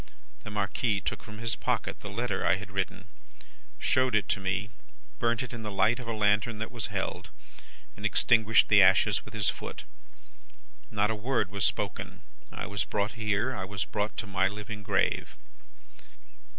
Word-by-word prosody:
The -, -, -6 dB
Marquis 105 Hz, +1 st, 0 dB
took -, -, -3 dB
from 105 Hz, -1 st, -10 dB
his 115 Hz, 0 st, -1 dB
pocket -, -, -2 dB
the -, -, -7 dB
letter -, -, -2 dB
I -, -, +4 dB
had 100 Hz, +1 st, -8 dB
written, 95 Hz, 0 st, -2 dB, 0.7 s
showed 130 Hz, -3 st, +2 dB
it 105 Hz, -, +2 dB
me, 100 Hz, +2 st, -2 dB, 0.5 s
burnt 120 Hz, +1 st, +1 dB
it 125 Hz, -, -7 dB
in 120 Hz, -, -6 dB
the 105 Hz, -, -4 dB
light 105 Hz, +5 st, +2 dB
of 125 Hz, -, -7 dB
a -, -, -1 dB
lantern 105 Hz, 0 st, +2 dB
that 110 Hz, +1 st, -4 dB
was 115 Hz, -3 st, -3 dB
held, 100 Hz, -3 st, -3 dB, 0.7 s
and 100 Hz, -, -11 dB
extinguished 110 Hz, +1 st, +4 dB
the 105 Hz, -1 st, +7 dB
ashes 95 Hz, +2 st, +5 dB
with 110 Hz, -, -11 dB
his 105 Hz, -2 st, +2 dB
foot. -, -, -7 dB, 1.1 s
Not 105 Hz, +1 st, +1 dB
a -, -, -1 dB
word 110 Hz, -3 st, 0 dB
was 100 Hz, 0 st, 0 dB
spoken. -, -, -2 dB, 0.3 s
I -, -, -5 dB
was 100 Hz, 0 st, -1 dB
brought 105 Hz, +1 st, -1 dB
here, 110 Hz, +3 st, 0 dB
I 95 Hz, -, -3 dB
was 95 Hz, -1 st, -3 dB
brought 105 Hz, 0 st, -2 dB
to -, -, -2 dB
my 95 Hz, -1 st, +2 dB
living 105 Hz, +1 st, -6 dB
grave. 100 Hz, -, 0 dB
105 Hz, 175 wpm, -29 LUFS, 100-110 Hz, 1.1 s, the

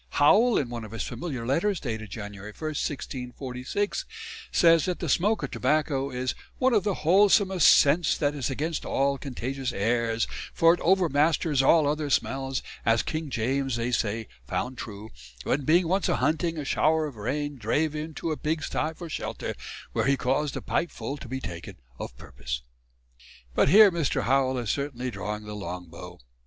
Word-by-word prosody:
Howell 220 Hz, +12 st, +5 dB
in 130 Hz, -, -1 dB
one 120 Hz, -1 st, -5 dB
of 110 Hz, 0 st, -10 dB
his 115 Hz, -, -3 dB
"Familiar 140 Hz, -9 st, -5 dB
Letters" 170 Hz, -, +1 dB
dated 110 Hz, -4 st, -5 dB
January 105 Hz, 0 st, -8 dB
1, 155 Hz, -, -3 dB
1646, 130 Hz, +4 st, -3 dB, 0.5 s
says 165 Hz, -3 st, +5 dB
that 180 Hz, -1 st, -1 dB
the 170 Hz, -, -4 dB
smoke 205 Hz, +9 st, +2 dB
of -, -, -3 dB
tobacco 145 Hz, -3 st, 0 dB
is 125 Hz, -1 st, -2 dB, 0.2 s
"one 260 Hz, 0 st, +3 dB
of 210 Hz, -4 st, +3 dB
the 200 Hz, -2 st, 0 dB
wholesomest 190 Hz, 0 st, +5 dB
sents 160 Hz, +3 st, +5 dB
that 145 Hz, -1 st, +1 dB
is 140 Hz, -3 st, -2 dB
against 150 Hz, +4 st, -2 dB
all 140 Hz, 0 st, 0 dB
contagious 135 Hz, 0 st, -4 dB
airs, 115 Hz, +2 st, 0 dB, 0.3 s
for 165 Hz, 0 st, +6 dB
it 175 Hz, -, -3 dB
overmasters 160 Hz, -4 st, +2 dB
all 155 Hz, +3 st, +5 dB
other 150 Hz, 0 st, -1 dB
smells, 135 Hz, -1 st, -1 dB, 0.2 s
as 115 Hz, 0 st, +3 dB
King 155 Hz, -1 st, -3 dB
James 130 Hz, +2 st, -1 dB
they 120 Hz, +1 st, -1 dB
say 110 Hz, -1 st, -1 dB, 0.2 s
found 125 Hz, 0 st, -3 dB
true, 105 Hz, 0 st, -8 dB, 0.3 s
when 140 Hz, 0 st, 0 dB
being 170 Hz, +3 st, +4 dB
once 190 Hz, +3 st, +1 dB
a -, -, +2 dB
hunting, 165 Hz, +1 st, 0 dB
a -, -, -2 dB
showr 155 Hz, +2 st, +2 dB
of 140 Hz, -, -9 dB
rain 145 Hz, +7 st, -3 dB
drave 155 Hz, +5 st, 0 dB
him 150 Hz, 0 st, -3 dB
into 160 Hz, +1 st, -4 dB
a 155 Hz, -, -2 dB
Pigsty 155 Hz, 0 st, -2 dB
for 175 Hz, -, -8 dB
shelter, 160 Hz, -, -4 dB, 0.4 s
wher -, -, +1 dB
he 140 Hz, +1 st, +3 dB
caus'd 135 Hz, +3 st, 0 dB
a -, -, -6 dB
pipe 175 Hz, -, 0 dB
full 140 Hz, -, -5 dB
to 140 Hz, -, -10 dB
Be 130 Hz, +2 st, -4 dB
taken 85 Hz, -8 st, -7 dB, 0.2 s
of -, -, -7 dB
purpose." -, -, -6 dB, 0.9 s
But 130 Hz, -, +3 dB
here 205 Hz, +3 st, +8 dB
Mr. 165 Hz, -5 st, 0 dB
Howell 130 Hz, +2 st, +2 dB
is 120 Hz, -4 st, -1 dB
certainly 130 Hz, -3 st, -3 dB
drawing 105 Hz, +1 st, -4 dB
the 105 Hz, 0 st, -7 dB
long 90 Hz, -3 st, -6 dB
bow. 90 Hz, +2 st, -10 dB
140 Hz, 180 wpm, -27 LUFS, 120-160 Hz, 0.9 s, here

